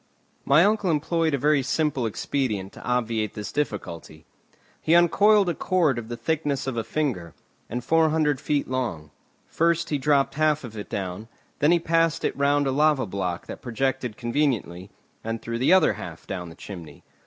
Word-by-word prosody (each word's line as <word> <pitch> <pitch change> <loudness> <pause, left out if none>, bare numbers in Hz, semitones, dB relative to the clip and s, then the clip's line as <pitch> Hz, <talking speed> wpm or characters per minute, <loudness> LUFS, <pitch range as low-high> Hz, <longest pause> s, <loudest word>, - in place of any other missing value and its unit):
My 150 +6 +5
uncle 210 -2 +1
employed 160 0 +1
a - - -1
very 150 +1 +3
simple 140 -2 0
expedient 105 -4 -2
to - - -12
obviate 115 -3 -1
this 105 -1 -5
difficulty. 85 - -4 0.6
He 165 - +3
uncoiled 200 +4 +5
a 175 - +1
cord 160 -8 +1
of 115 - -8
the 120 - -5
thickness 145 +2 -1
of 135 -2 -3
a 115 - -1
finger, 115 - -3 0.3
and 120 +2 -4
four 160 +3 +3
hundred 150 -3 +1
feet 145 -2 0
long; 90 - -3 0.3
first 170 0 0
he 145 - 0
dropped 140 0 +2
half 155 -1 +1
of 115 -3 -9
it 105 - -7
down, 95 +2 -4 0.3
then 150 +3 +4
he 175 - +5
passed 165 0 +1
it - - -1
round 145 0 +2
a 135 - +1
lava 150 -1 +2
block 90 -3 -3
that - - -8
projected 130 -1 -2
conveniently, 120 - -1 0.3
and 115 0 -3
threw 115 +1 -4
the 130 - +3
other 190 0 +5
half - - -9
down 90 -2 -5
the 80 - -12
chimney. 85 -8 -10
135 Hz, 180 wpm, -25 LUFS, 110-155 Hz, 0.6 s, My